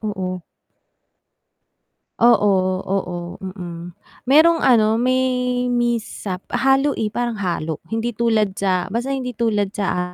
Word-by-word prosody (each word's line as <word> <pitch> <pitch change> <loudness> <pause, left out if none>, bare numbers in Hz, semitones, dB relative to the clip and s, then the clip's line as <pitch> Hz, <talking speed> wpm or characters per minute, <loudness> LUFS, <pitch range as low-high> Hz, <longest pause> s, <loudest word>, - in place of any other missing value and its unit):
Oo. 185 -4 -4 1.8
Oo, 215 -4 +5 0.4
oo. 180 -2 -3 0.2
Mm. 175 -2 -8 0.3
Merong 325 +4 +5
ano 225 -2 +4
may 255 +1 +2 0.5
mishap 230 -5 -2
halo, 270 +2 +3
eh, 215 - 0
parang 240 0 -3
halo. 165 -4 -2
Hindi 225 +2 -2
tulad 220 -3 +1
sa 185 -2 0
basta 240 +4 -2
hindi 250 -2 -4
tulad 210 -3 0
sa 205 - -3
a - - 0
215 Hz, 120 wpm, -20 LUFS, 190-240 Hz, 1.8 s, Oo